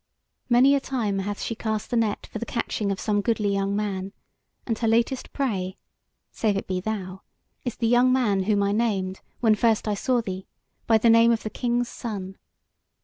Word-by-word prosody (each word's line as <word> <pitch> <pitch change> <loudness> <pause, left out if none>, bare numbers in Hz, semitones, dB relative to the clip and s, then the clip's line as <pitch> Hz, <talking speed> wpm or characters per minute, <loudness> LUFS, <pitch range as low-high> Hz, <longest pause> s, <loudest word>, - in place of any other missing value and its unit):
Many 255 +3 +6
a 280 - +3
time 225 -8 -2
hath 205 +1 -3
she - - -2
cast 220 -1 -3
the - - +1
net 225 -3 0
for - - -4
the 235 - -4
catching 215 -3 -2
of 195 - -3
some 205 -1 +1
goodly 210 -2 0
young 195 0 0
man; 195 -2 -3 0.5
and 230 - 0
her 230 - 0
latest 235 +3 +1
prey 195 -9 -2 0.5
(save 210 -3 0
it - - -3
be 185 -1 -2
thou) 190 -2 -4 0.4
is 245 - -2
the 230 - -2
young 245 +2 +4
man 225 -7 +2
whom 205 -1 +2
I 200 - +1
named, 200 -4 -1 0.2
when 225 -3 +5
first 225 0 +2
I 210 - +1
saw 245 +4 +1
thee, 190 -4 -5 0.4
by 225 - +6
the 230 +1 +4
name 230 +1 +6
of 230 - 0
the 215 - -4
King's 240 -1 0
Son. 195 -4 -6
215 Hz, 200 wpm, -25 LUFS, 200-235 Hz, 0.5 s, Many